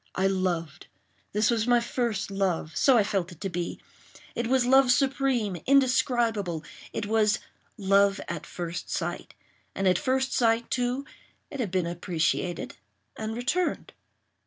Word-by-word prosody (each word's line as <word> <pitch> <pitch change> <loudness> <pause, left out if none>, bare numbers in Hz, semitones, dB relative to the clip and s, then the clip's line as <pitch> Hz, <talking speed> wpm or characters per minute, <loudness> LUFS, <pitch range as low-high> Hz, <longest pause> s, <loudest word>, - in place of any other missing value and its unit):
I 190 - +1
loved. 175 -4 -1 0.4
This 210 +2 +2
was 225 -1 0
my 245 0 +5
first 235 -4 -2
love—so 195 - +2
I 215 - +5
felt 190 -3 -2
it 165 - -17
to 195 - -2
be. 175 -1 -4 0.5
It 235 - -2
was 255 0 +3
love 265 0 +5
supreme—indescribable. 245 - +2 0.3
It 220 - -3
was 215 0 +2 0.4
"love 200 0 +3
at 170 -3 -5
first 175 -1 -5
sight;" - - -4 0.4
and 195 - 0
at 180 -1 +3
first 265 0 0
sight, 230 -1 +2
too, 250 +3 -1 0.5
it 280 - -6
had 230 -6 -1
been 185 -1 0
appreciated 175 0 -2 0.4
and 220 0 -4
returned. 270 +10 -1
215 Hz, 135 wpm, -27 LUFS, 185-245 Hz, 0.5 s, my